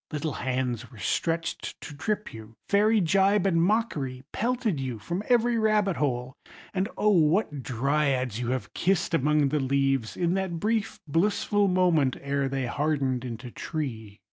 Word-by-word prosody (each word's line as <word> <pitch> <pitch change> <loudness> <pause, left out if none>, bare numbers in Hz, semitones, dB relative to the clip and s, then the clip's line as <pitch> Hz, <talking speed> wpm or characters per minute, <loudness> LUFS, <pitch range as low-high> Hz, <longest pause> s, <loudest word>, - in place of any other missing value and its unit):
Little 150 -1 -2
hands 125 -2 -2
were 115 - -13
stretched 165 +9 -2
to 150 - -8
trip 210 +8 -3
you, 110 0 -11
fairy 210 +1 +4
gibe 195 +3 +3
and 165 -4 +3
mockery 165 - 0
pelted 235 - -1
you 130 -3 -3
from 175 - -4
every 240 -1 +3
rabbit 215 -4 +2
hole; 125 -3 -1 0.4
and 190 +2 0
O 210 - +3
what 165 -4 +2
Dryads 130 -2 0
you 120 -1 -2
have 130 0 -3
kissed 180 -2 +1
among 150 -1 +3
the 150 - 0
leaves, 135 -3 0
in 175 -1 +1
that 190 -3 -2
brief 220 +2 -1
blissful 200 +5 +2
moment 175 -8 +2
ere 140 -1 -1
they 135 -1 -2
hardened 135 -1 0
into 120 0 -6
tree! 115 -12 -5
150 Hz, 155 wpm, -27 LUFS, 130-195 Hz, 0.4 s, fairy